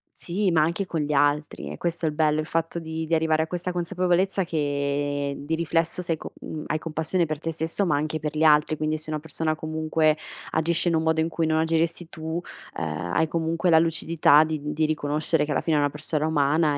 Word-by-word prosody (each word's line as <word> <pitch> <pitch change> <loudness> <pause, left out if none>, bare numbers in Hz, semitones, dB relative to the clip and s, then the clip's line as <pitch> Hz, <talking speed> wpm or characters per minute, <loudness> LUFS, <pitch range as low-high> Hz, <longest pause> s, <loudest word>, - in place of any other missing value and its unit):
Sì, 190 +3 0
ma 160 -2 +4
anche 170 +5 -1
con 160 -3 -2
gli 150 0 -1
altri. 145 +1 +1
È - - -7
questo 170 -1 -1
il - - +1
bello, 155 0 +2
il 155 - -7
fatto 165 +1 -1
di 160 0 -4
di 165 - -3
arrivare 160 -1 +2
a - - -5
questa 180 +1 -3
consapevolezza 180 +2 +1
che, 145 -2 -1
di 150 +3 -2
riflesso 165 +1 0
sei 165 -2 -1
co - - -9
mhmm, 155 -1 -6
hai 155 - -1
compassione 160 +2 -1
per 155 -1 -3
te 165 0 -3
stesso, 165 +5 -1
ma 150 -4 +2
anche 155 +1 -2
per 150 0 -4
gli 155 - -1
altri. 150 0 +4
Quindi 155 0 -1
se 155 0 -7
una 155 - -1
persona, 155 +1 -2
comunque, 155 0 +1 0.3
agisce 170 +2 +1
in 165 - +1
un 160 - +1
modo 160 0 +2
in 165 - 0
cui 165 0 -1
non 160 0 +2
agiresti 165 +1 0
tu, 160 +2 -4 0.4
ehm, 85 +2 -3
hai 160 - +2
comunque 165 +2 0
la 160 - +6
lucidità 160 -2 +4
di 160 0 -2 0.2
di 155 0 +1
riconoscere 150 0 0
che 150 - -4
alla - - +1
fine 160 -2 +1
è - - +3
una 145 0 +2
persona 150 0 -2
umana 150 0 +2
160 Hz, 225 wpm, -25 LUFS, 150-165 Hz, 0.4 s, la